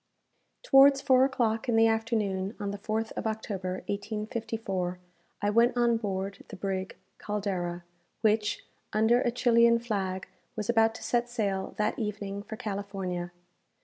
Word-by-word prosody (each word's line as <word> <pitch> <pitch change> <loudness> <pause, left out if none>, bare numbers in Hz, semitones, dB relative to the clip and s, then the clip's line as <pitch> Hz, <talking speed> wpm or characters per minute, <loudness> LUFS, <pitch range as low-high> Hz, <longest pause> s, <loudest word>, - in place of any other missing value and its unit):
Towards 275 - +7
four 260 -2 +5
o'clock 235 -3 0
in 235 - +3
the 225 0 +6
afternoon, 220 -3 0
on 200 -1 -2
the 200 - -6
4th 220 +2 -2
of - - -3
October, 195 -4 -3
1854, 210 -3 -3 0.5
I 205 - +3
went 235 +3 +4
on 235 -1 +3
board 195 -2 -3
the - - -9
brig 190 -1 -3 0.2
"Caldera," 185 -4 -3 0.4
which, 215 -1 +1 0.3
under 220 +3 +4
a - - +2
Chilian 235 -1 +4
flag, 195 -5 -3 0.3
was 215 0 -4
about 225 -1 +3
to - - -9
set 240 0 0
sail 200 -5 -2
that 210 +1 0
evening 200 -2 -3
for 220 - -7
California. 195 -4 -4
215 Hz, 145 wpm, -29 LUFS, 195-230 Hz, 0.5 s, Towards